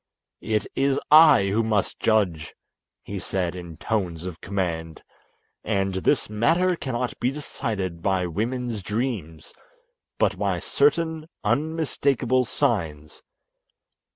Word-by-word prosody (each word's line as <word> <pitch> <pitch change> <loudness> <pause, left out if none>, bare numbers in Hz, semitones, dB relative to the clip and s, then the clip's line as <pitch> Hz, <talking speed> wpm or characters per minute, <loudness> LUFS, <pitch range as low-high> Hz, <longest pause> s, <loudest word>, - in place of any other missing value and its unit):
"It 105 -1 0
is 135 0 +2
I 155 -8 +8
who 105 +4 +2
must 110 -3 0
judge," 100 -8 +1 0.5
he 100 -1 -5
said 90 -2 -2
in 85 -3 -9
tones 90 -6 -2
of 90 -3 -7
command; 85 -5 -3 0.6
"and 95 -2 0
this 95 - +1
matter 165 - +2
cannot 125 -5 -3
be 125 - +1
decided 100 - -4
by 95 -1 +1
women's 115 +5 -2
dreams, 105 - -4 0.6
but - - +1
by - - 0
certain 160 - +1 0.2
unmistakable 140 -5 +1
signs. 80 - -2
105 Hz, 110 wpm, -24 LUFS, 90-130 Hz, 0.6 s, I